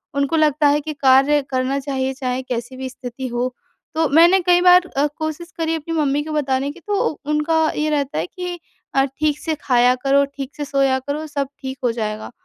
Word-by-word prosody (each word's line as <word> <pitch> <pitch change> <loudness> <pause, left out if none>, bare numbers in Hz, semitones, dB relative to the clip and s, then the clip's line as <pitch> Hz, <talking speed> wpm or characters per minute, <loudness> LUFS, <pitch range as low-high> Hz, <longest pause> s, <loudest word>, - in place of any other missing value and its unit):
उनको 280 +2 0
लगता 300 -1 +3
है 290 +1 +3
कि 310 +1 -5
कार्य 275 +1 +4
करना 260 +1 0
चाहिए 265 -1 -2
चाहे 255 -1 -3
कैसी 245 0 -5
भी 260 0 -5
स्थिति 255 0 -7
हो। 245 +1 -2 0.4
तो 320 0 +2
मैंने 340 +6 +6
कई 355 0 +5
बार 360 0 +6
अ, 280 +2 +3
कोशिश 315 +2 -5
करी 325 0 0
अपनी 325 +1 -5
मम्मी 290 -1 +1
को 310 - -7
बताने 275 -2 0
की, 315 - -14
तो 405 +3 0 0.2
उनका 300 +2 +1 0.2
ये 305 +1 0
रहता 285 - -1
है 160 - -1
कि 360 - -6 0.4
अ, 270 - +5
"ठीक 300 +2 -1
से 315 0 -2
खाया 250 -1 +4
करो, 275 +2 +2
ठीक 280 -1 -8
से 295 - -4
सोया 275 -2 +2
करो, 285 +4 -4
सब 285 -2 -2
ठीक 265 0 -5
हो 245 - +2
जाएगा।" 220 0 -4
280 Hz, 205 wpm, -20 LUFS, 260-310 Hz, 0.4 s, मैंने